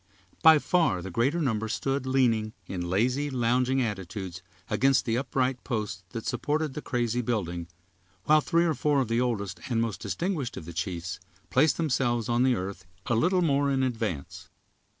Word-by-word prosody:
By 160 -1 +8
far 150 - +1
the 95 - -6
greater 130 - +1
number 110 -5 0
stood 135 +4 -2
leaning, 115 -5 +2
in 90 -2 -4
lazy, 125 +10 +1
lounging 125 +1 +1
attitudes, 95 -3 -5 0.3
against 135 0 +2
the 115 - 0
upright 130 -1 -1
posts 105 -6 -3
that 115 -2 -6
supported 150 -1 -1
the 150 - -5
crazy 120 -3 -1
building, 90 -8 -2 0.6
while 155 0 +5
three 170 +2 +2
or 165 - +2
four 145 -2 +1
of 125 - -2
the 115 +1 +2
oldest 110 -6 -2
and 115 -2 +1
most 115 -2 -2
distinguished 170 -9 -2
of - - -7
the 85 - -8
chiefs 85 +1 -4 0.3
placed 150 +5 +4
themselves 125 -7 0
on 120 +1 +2
the 130 -1 +4
earth 95 -2 -5 0.2
a - - 0
little 180 - +3
more 140 -3 +2
in 135 -1 +1
advance. 110 - -3
120 Hz, 170 wpm, -28 LUFS, 105-140 Hz, 0.6 s, By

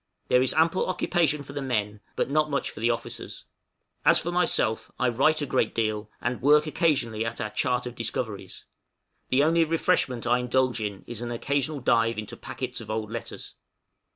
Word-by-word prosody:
There 125 - +5
is 130 - +3
ample 165 +3 +3
occupation 165 -5 +1
for 140 - -10
the 145 - -3
men 105 -5 -1 0.2
but - - 0
not 150 +2 +1
much 140 -1 -1
for - - -10
the 115 +2 +2
officers; 115 -1 -4 0.6
as - - +6
for 175 - -3
myself, 165 -10 +1
I 125 - +2
write 145 +6 +2
a - - 0
great 115 - 0
deal, 110 -1 -1
and 120 0 -2
work 150 +3 +5
occasionally 135 -9 +1
at 115 0 -4
our 105 - -3
chart 125 +2 0
of 125 - -5
discoveries; 115 -3 -4 0.6
the 130 +2 +4
only 165 +2 +4
refreshment 160 -7 +1
I 120 +1 +3
indulge 125 -1 +1
in 100 -2 -4
is 120 -1 -7
an 120 - -4
occasional 140 +4 -1
dive 115 -1 +2
into 105 -1 -5
packets 125 -1 -5
of 110 - -10
old 110 0 -3
letters. 115 -2 -7
125 Hz, 185 wpm, -26 LUFS, 115-150 Hz, 0.6 s, as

